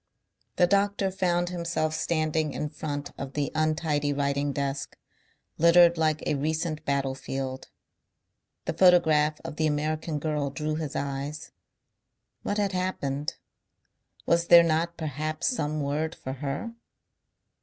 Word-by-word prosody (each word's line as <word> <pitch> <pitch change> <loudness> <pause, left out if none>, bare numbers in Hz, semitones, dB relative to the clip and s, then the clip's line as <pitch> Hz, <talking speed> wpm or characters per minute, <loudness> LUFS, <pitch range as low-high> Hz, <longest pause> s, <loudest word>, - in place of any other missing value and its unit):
The 180 - +5
doctor 200 +1 +1
found 175 -2 0
himself 170 -3 -1
standing 155 -2 0
in 150 0 -3
front 145 -2 -5
of 135 -1 -5
the 145 -1 -1
untidy 155 -2 0
writing 140 0 0
desk, 140 0 -3 0.6
littered 170 +1 +7
like 155 -2 +1
a - - +1
recent 155 +2 -2
battlefield. 135 -1 -3 1.0
The - - -1
photograph 155 -5 +4
of 150 - -7
the 155 - +2
American 155 +1 -1
girl 150 -1 -1
drew 150 +2 -3
his 155 -2 -4
eyes. 140 +2 -4 0.9
What 205 - -2
had 200 -2 +1
happened? 150 -6 -2 0.9
Was 170 0 +2
there 170 -1 +9
not 170 +1 0
perhaps 155 0 -3
some 155 - 0
word 155 +3 -2
for 130 - -6
her? 140 - -4
155 Hz, 125 wpm, -27 LUFS, 145-170 Hz, 1.0 s, there